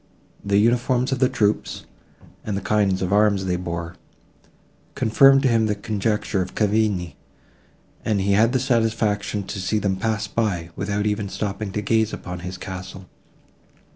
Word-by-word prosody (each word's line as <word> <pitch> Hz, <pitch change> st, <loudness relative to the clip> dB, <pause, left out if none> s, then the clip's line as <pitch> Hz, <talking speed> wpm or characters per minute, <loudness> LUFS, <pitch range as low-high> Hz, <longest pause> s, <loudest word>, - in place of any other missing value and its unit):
The 100 Hz, 0 st, +1 dB
uniforms 120 Hz, +4 st, +2 dB
of 135 Hz, -, -1 dB
the 130 Hz, -1 st, +3 dB
troops, 110 Hz, -4 st, -1 dB, 0.6 s
and 105 Hz, -2 st, -3 dB
the -, -, -3 dB
kind 100 Hz, -3 st, +1 dB
of 90 Hz, +1 st, -1 dB
arms 100 Hz, -2 st, +3 dB
they 90 Hz, -1 st, 0 dB
bore, 85 Hz, 0 st, -5 dB, 1.0 s
confirmed 135 Hz, +5 st, +5 dB
to -, -, +4 dB
him 115 Hz, -3 st, +2 dB
the 105 Hz, -, 0 dB
conjecture 105 Hz, -1 st, -1 dB
of 90 Hz, -, -5 dB
Cavigni, 105 Hz, -5 st, 0 dB, 0.9 s
and 105 Hz, -3 st, 0 dB
he 100 Hz, +1 st, +1 dB
had 110 Hz, +4 st, +4 dB
the 130 Hz, -, +1 dB
satisfaction 110 Hz, -5 st, 0 dB
to 95 Hz, 0 st, -5 dB
see 95 Hz, +4 st, 0 dB
them 100 Hz, -2 st, 0 dB
pass 110 Hz, +2 st, -1 dB
by, 90 Hz, -7 st, -2 dB
without 105 Hz, +1 st, -2 dB
even 105 Hz, -1 st, -1 dB
stopping 100 Hz, 0 st, -4 dB
to 105 Hz, -, -2 dB
gaze 110 Hz, 0 st, +1 dB
upon 90 Hz, 0 st, -6 dB
his 90 Hz, +1 st, -6 dB
castle. 95 Hz, 0 st, -8 dB
105 Hz, 160 wpm, -23 LUFS, 95-110 Hz, 1.0 s, confirmed